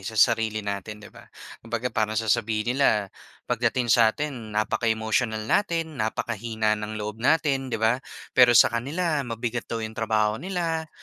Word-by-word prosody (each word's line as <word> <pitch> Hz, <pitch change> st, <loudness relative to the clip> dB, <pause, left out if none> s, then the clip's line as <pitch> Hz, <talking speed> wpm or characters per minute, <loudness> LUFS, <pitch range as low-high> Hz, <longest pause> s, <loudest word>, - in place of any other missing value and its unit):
sa 110 Hz, +4 st, -7 dB
sarili 110 Hz, -2 st, +2 dB
natin, 100 Hz, +1 st, -4 dB
'di -, -, -13 dB
ba? -, -, -15 dB, 0.3 s
Kung 115 Hz, -, -15 dB
baga 120 Hz, +2 st, -2 dB
parang 110 Hz, -1 st, 0 dB
sasabihin 110 Hz, +1 st, 0 dB
nila 105 Hz, -7 st, +1 dB, 0.3 s
pagdating 120 Hz, 0 st, +1 dB
sa 115 Hz, -1 st, +6 dB
atin 150 Hz, 0 st, -2 dB, 0.2 s
napaka-emotional 110 Hz, 0 st, 0 dB
natin, 165 Hz, -, 0 dB
napakahina 110 Hz, 0 st, -1 dB
ng 105 Hz, 0 st, -3 dB
loob 105 Hz, +1 st, -5 dB
natin 135 Hz, -1 st, +2 dB
'di -, -, -2 dB
ba, 115 Hz, +3 st, +1 dB, 0.3 s
pero 120 Hz, -2 st, +6 dB
sa 115 Hz, -, +6 dB
kanila 150 Hz, +6 st, -1 dB
mabigat 120 Hz, -1 st, -4 dB
daw 115 Hz, -1 st, -3 dB
'yong 110 Hz, -, -6 dB
trabaho 110 Hz, -1 st, 0 dB
nila 165 Hz, -3 st, -2 dB
115 Hz, 160 wpm, -25 LUFS, 110-130 Hz, 0.3 s, sa